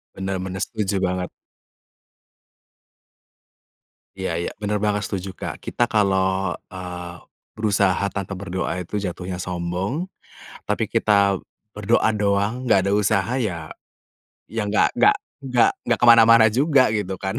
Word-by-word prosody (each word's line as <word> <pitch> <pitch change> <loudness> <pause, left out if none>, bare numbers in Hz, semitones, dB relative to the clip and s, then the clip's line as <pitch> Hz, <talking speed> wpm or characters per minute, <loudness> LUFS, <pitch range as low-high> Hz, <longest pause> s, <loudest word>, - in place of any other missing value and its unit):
Bener 95 0 -3
bener, 95 0 -5
setuju 105 -3 -2
banget. 90 0 -2 2.9
Iya 95 -2 -3
iya, 85 - -2
bener 105 0 0
banget, 105 0 0
setuju 95 -1 -4
Kak. - - -6
Kita - - -1
kalau, 95 -3 +1 0.2
eee, 90 -1 -7 0.4
berusaha 100 -3 +1
tanpa 100 0 -4
berdoa 95 -1 -3
itu 95 +3 -4
jatuhnya 90 -1 -5
sombong, 90 - -3 0.6
tapi - - -1
kita 100 -2 +2 0.4
berdoa 105 +3 +2
doang 100 +3 0
nggak 100 -6 +3
ada 100 - +1
usaha 105 +2 +1
ya, 90 -11 -3 0.8
ya - - -2
nggak - - +1
nggak 415 - +6 0.3
nggak 125 -2 +4 0.2
nggak 120 -1 +1
ke - - +5
mana-mana 115 -1 +7
juga 135 +2 +3
gitu 105 -3 -2
kan? 95 0 -2
100 Hz, 130 wpm, -22 LUFS, 95-110 Hz, 2.9 s, mana-mana